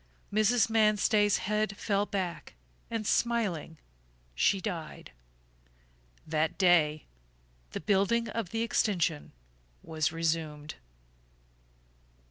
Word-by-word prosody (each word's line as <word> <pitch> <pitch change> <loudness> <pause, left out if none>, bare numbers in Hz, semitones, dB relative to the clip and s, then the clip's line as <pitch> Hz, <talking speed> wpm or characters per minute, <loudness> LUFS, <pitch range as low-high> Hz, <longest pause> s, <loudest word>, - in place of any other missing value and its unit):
Mrs. 215 +3 +3
Manstey's 215 -1 +3
head 210 0 -1
fell 205 -1 0
back 185 - -4 0.3
and 225 -2 -3
smiling 205 -10 0 0.6
she 190 - +2
died. 175 -6 -6 1.1
That 155 0 -1
day 165 -5 +3 0.7
the - - -4
building 205 +6 +2
of 225 -6 -3
the 225 +3 -1
extension 175 -9 0 0.5
was 155 -1 -1
resumed. 160 -2 -2
195 Hz, 90 wpm, -29 LUFS, 160-215 Hz, 1.1 s, Mrs